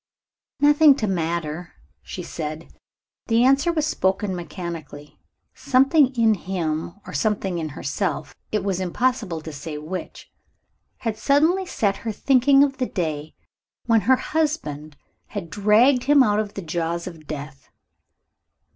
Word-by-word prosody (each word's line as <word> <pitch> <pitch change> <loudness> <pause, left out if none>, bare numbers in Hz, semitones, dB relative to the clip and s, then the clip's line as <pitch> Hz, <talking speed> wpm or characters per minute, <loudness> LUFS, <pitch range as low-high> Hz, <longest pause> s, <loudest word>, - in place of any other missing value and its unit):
"Nothing 290 0 +6
to 230 - -2
matter," 170 -3 -3 0.3
she 180 - -7
said. 155 0 -6 0.5
The 230 +1 +3
answer 275 +6 +4
was 310 -3 0
spoken 190 -7 0
mechanically. 170 -5 -8 0.3
Something 275 0 +3
in 225 -2 +4
him 170 -4 -3
or - - -9
something 195 -5 -1
in 160 -1 -3
herself, 180 +8 -3 0.2
it 210 -2 0
was 195 -2 -1
impossible 190 -2 -1
to 160 0 -8
say 150 +1 -6
which, 160 +5 -7 0.7
had 220 -2 -3
suddenly 315 - +2
set 200 - 0
her 225 - -4
thinking 275 +4 +4
of 270 -2 0
the 255 - -1
day 155 -4 -4 0.5
when 225 -2 +3
her 260 - +8
husband 155 - -2 0.3
had 185 -7 -6
dragged 220 +7 +4
him 285 -1 +6
out 210 -3 +2
of 210 -2 -4
the 195 - -5
jaws 170 +1 -2
of 160 -4 -10
death. 140 -2 -8
195 Hz, 140 wpm, -23 LUFS, 165-255 Hz, 0.7 s, her